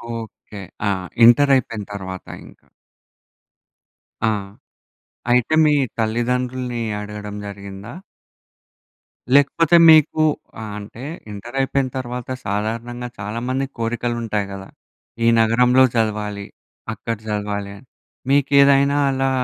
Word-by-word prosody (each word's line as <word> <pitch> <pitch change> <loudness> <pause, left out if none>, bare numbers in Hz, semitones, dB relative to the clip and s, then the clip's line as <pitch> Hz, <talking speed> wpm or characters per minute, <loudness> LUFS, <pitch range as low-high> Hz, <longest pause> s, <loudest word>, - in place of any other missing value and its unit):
Okay. 110 -2 -9 0.3
ఆ! - - +2 0.4
Inter 140 +4 +6
అయిపోయిన 115 -4 -2
తర్వాత 95 -2 -7 0.2
ఇంక. - - -16 1.7
ఆ! - - +3 1.0
అయితే 125 +5 +2
మీ 150 - +4 0.2
తల్లిదండ్రుల్ని 120 +2 -1 0.2
అడగడం 105 0 -7
జరిగిందా? 100 +2 -9 1.4
లేకపోతే 160 +4 +4
మీకు 155 0 +5 0.4
ఆహ్, 110 -2 -6
అంటే 105 +4 -11 0.3
ఇంటర్ 110 +6 -9
అయిపోయిన 135 0 0
తర్వాత 125 -1 -5 0.2
సాధారణంగా 115 +4 -3
చాలామందికి 125 +6 -3
కోరికలు 120 +1 -2
ఉంటాయి 105 -2 -1
గదా! 95 0 -8 0.6
ఈ - - +4
నగరంలో 125 +3 +4
చదవాలి, 105 -2 -1 0.5
అక్కడ 115 +1 -4
చదవాలి 105 -1 -3
అని. 115 - -17 0.4
మీకేదైనా 140 0 +4
అలా 135 0 0
115 Hz, 100 wpm, -20 LUFS, 105-130 Hz, 1.7 s, ఇంటర్